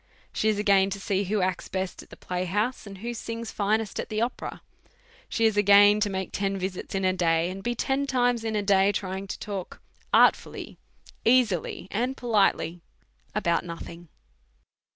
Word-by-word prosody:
She 220 - +1
is 215 - +1
again 200 -2 +4
to 200 0 -4
sec 195 -1 -1
who 210 +1 0
acts 185 0 -1
best 190 -1 -4
at - - -17
the - - -13
playhouse, 200 +7 -2
and 195 -1 -9
who 235 +5 -5
sings 230 0 -5
finest 215 +1 -1
at - - -4
the 215 - -2
opera. 235 +2 -3 0.7
She 225 - +1
is 220 -2 +2
again 205 +1 +6
to 210 -1 +1
make 190 -1 -3
ten 195 0 -1
visits 190 0 -5
iti 195 -1 0
a 185 - +2
day, 170 -1 +1
and 195 +1 -7
be 240 +3 -2
ten 270 +3 0
times 245 -3 +1
in 220 -1 -2
a 210 - 0
diy 195 0 +3
trying 190 0 -3
to - - -5
telk 195 -4 -6 0.3
artfully, - - +2 0.4
easily, 225 -8 +2
and 250 +5 -1
politely, 195 -7 +1 0.5
about 170 -5 +1
UQthing. 170 0 -8
200 Hz, 175 wpm, -26 LUFS, 190-220 Hz, 0.7 s, again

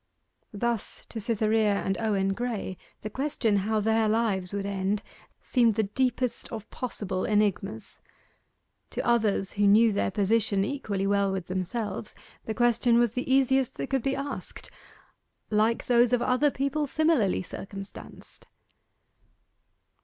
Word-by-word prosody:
Thus 235 +1 -2
to 225 - -5
Cytherea 215 -1 +2
and 195 -1 -1
Owen 195 -3 +1
Graye 225 -4 -3 0.3
the 215 - -5
question 255 -6 0
how 215 +3 0
their 220 +1 +2
lives 210 -5 0
would 200 -1 -3
end 200 +1 -1 0.4
seemed 235 -4 +3
the 220 - +2
deepest 250 +3 -1
of 220 -1 -6
possible 200 -7 -3
enigmas. 210 0 -1 0.9
To - - -3
others 215 -5 +2
who 205 0 +2
knew 215 +2 +6
their 200 - 0
position 200 0 +1
equally 205 -7 -2
well 200 0 +2
with 190 -2 -3
themselves 190 +4 -3 0.3
the 220 - -3
question 240 0 +3
was 240 -2 +3
the 250 +1 -3
easiest 265 -1 +2
that - - -4
could 270 -1 +1
be 270 +2 0
asked 280 +1 -6 0.8
'Like 220 +2 +2
those 240 0 +4
of 245 - +3
other 260 +3 +3
people 280 +2 -1
similarly 300 - +2
circumstanced. 195 +2 -10
220 Hz, 135 wpm, -27 LUFS, 200-240 Hz, 0.9 s, knew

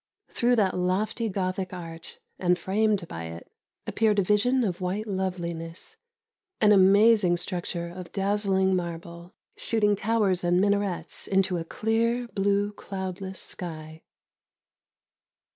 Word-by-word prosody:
Through 245 +1 +2
that 200 -5 +2
lofty 205 +5 0
Gothic 185 -1 -2
arch, 165 -2 -8 0.2
and 180 -1 +2
framed 200 0 0
by 80 - -6
it, 85 +1 -9 0.3
appeared 220 -2 +1
a 200 - +4
vision 230 +7 +2
of 185 -4 -2
white 190 +4 -2
loveliness, 175 -4 -4 0.6
an 210 -1 +5
amazing 200 -1 +5
structure 175 -1 -3
of 175 0 -9
dazzling 195 -1 +1
marble, 170 +1 -6 0.2
shooting 210 -2 +1
towers 200 -3 +1
and 175 +1 +3
minarets 200 -4 -1
into 190 -2 +1
a 165 - -3
clear, 230 +6 0
blue, 200 0 +1
cloudless 190 -1 -6
sky. 160 -2 -7
190 Hz, 120 wpm, -26 LUFS, 175-210 Hz, 0.6 s, an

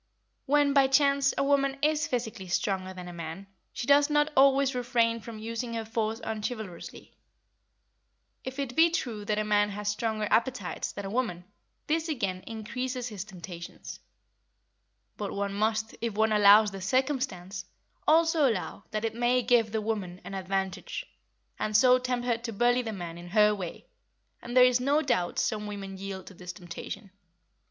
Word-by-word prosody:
When, 290 0 +4
by 275 -1 +5
chance, 280 0 +4
a - - +2
woman 275 -1 +2
is 305 +1 +2
physically 225 - -3
stronger 185 +1 -1
than 180 -1 -8
a 175 - -8
man, 170 +3 -7 0.3
she - - -5
does 285 +2 +5
not 295 +1 +2
always 275 0 +5
refrain 240 -2 +1
from 225 0 -9
using 230 +2 -4
her 225 -1 -3
force 225 0 -2
unchivalrously. 220 -3 -6 1.3
If 260 +1 -6
it 275 -3 -3
be 325 +2 +6
true 235 -10 -3
that 210 0 0
a 215 - +1
man 205 -1 +2
has 205 0 -3
stronger 215 0 -1
appetites 230 -3 0
than 200 - -6
a - - -4
woman, 215 -8 -2 0.4
this 325 +2 0
again 195 -11 -2
increases 250 +3 -4
his 205 -4 -5
temptations; 180 -3 -9 1.2
but 205 -2 -4
one 200 0 -2
must, 215 +1 0
if 230 -3 -2
one 220 +1 +2
allows 210 0 +7
this 195 -1 -6
circumstance, 210 -8 -1 0.4
also 320 -3 +4
allow 205 -2 -4
that 215 +1 -2
it 225 - -1
may 245 +2 +2
give 235 -2 +3
the 220 0 -1
woman 200 -5 -3
an - - -8
advantage, 190 0 -3 0.5
and 215 0 +2
so 255 +2 +6
tempt 250 -1 -2
her 235 -2 +1
to 235 0 -5
bully 240 +3 +2
the 225 -2 -4
man 175 -4 -6
in 175 - -10
her 210 +3 +4
way, 185 -5 -6 0.6
and 240 +1 -3
there 250 - +9
is 250 -1 +4
no 285 +4 +2
doubt 180 -10 0
some 210 -1 -1
women 195 -2 -6
yield 190 -1 -6
to - - -11
this 180 0 -8
temptation. 180 +3 -8
220 Hz, 170 wpm, -28 LUFS, 195-255 Hz, 1.3 s, there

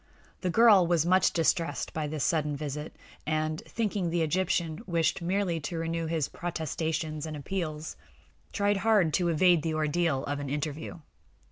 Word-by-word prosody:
The 185 - -1
girl 205 -3 +6
was 170 -2 +2
much 185 +1 +4
distressed 165 -2 0
by 155 -1 -2
this 150 -1 -3
sudden 150 -3 +1
visit, 150 +1 -5 0.3
and, 155 0 -1
thinking 210 -4 -1
that - - 0
the 170 0 +1
Egyptian 165 0 0
wished 170 0 +1
merely 180 -1 0
to 165 +3 -5
renew 165 0 -2
his 160 -3 0
protestations 160 -2 -3
and 155 -1 -5
appeals, 155 -1 -4 0.6
tried 205 -1 +1
hard 195 -6 +3
to 180 -2 +2
evade 170 0 +4
the 160 0 -2
ordeal 155 -2 0
of 145 0 -3
an 140 -1 -4
interview. 150 +3 -4
165 Hz, 160 wpm, -29 LUFS, 155-175 Hz, 0.6 s, girl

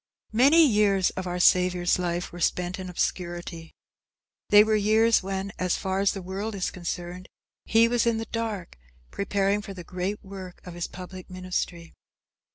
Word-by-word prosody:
Many 285 +8 +6
years 205 -6 +3
of 185 -1 -5
our 180 0 -3
Saviour's 180 0 +3
life 175 0 -2
were 175 - -9
spent 180 +2 0
in 185 -1 -6
obscurity. 175 -2 -4 0.7
They 205 0 +8
were 220 0 0
years 220 +2 +4
when, 195 +1 -4
as 180 -1 +1
far 190 0 -2
as 200 0 +2
the 195 - -6
world 200 +4 -4
is 190 - -2
concerned, 175 +1 -6 0.4
he 225 +1 +5
was 240 0 +1
in 230 -1 +2
the 225 - -3
dark, 220 - -4 0.3
preparing 200 0 0
for 200 -2 -8
the 180 - -8
great 185 +5 -4
work 190 -2 -9
of 180 - -8
his 175 0 -4
public 185 0 -10
ministry. 180 -2 -4
190 Hz, 165 wpm, -26 LUFS, 180-210 Hz, 0.7 s, They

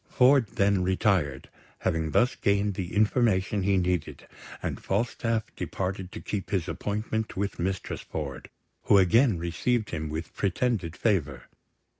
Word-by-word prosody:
Ford 130 -2 +5
then 100 -1 +3
retired, 90 -7 +1 0.3
having 80 -1 -1
thus 125 - +2
gained 100 0 +1
the 90 0 -5
information 105 -2 +2
he 95 +1 +2
needed; 90 -3 -1 0.4
and - - -3
Falstaff 115 +1 -1
departed 95 -1 -4
to - - -7
keep 100 -3 -4
his 95 -5 -1
appointment 110 +1 -3
with 100 0 -2
Mistress 95 +2 -2
Ford, 70 -5 -6 0.4
who 100 - +6
again 110 +3 +4
received 100 +7 -1
him 80 -2 -3
with 80 +2 -5
pretended 100 -3 -1
favour. 75 - 0
95 Hz, 135 wpm, -27 LUFS, 85-110 Hz, 0.4 s, who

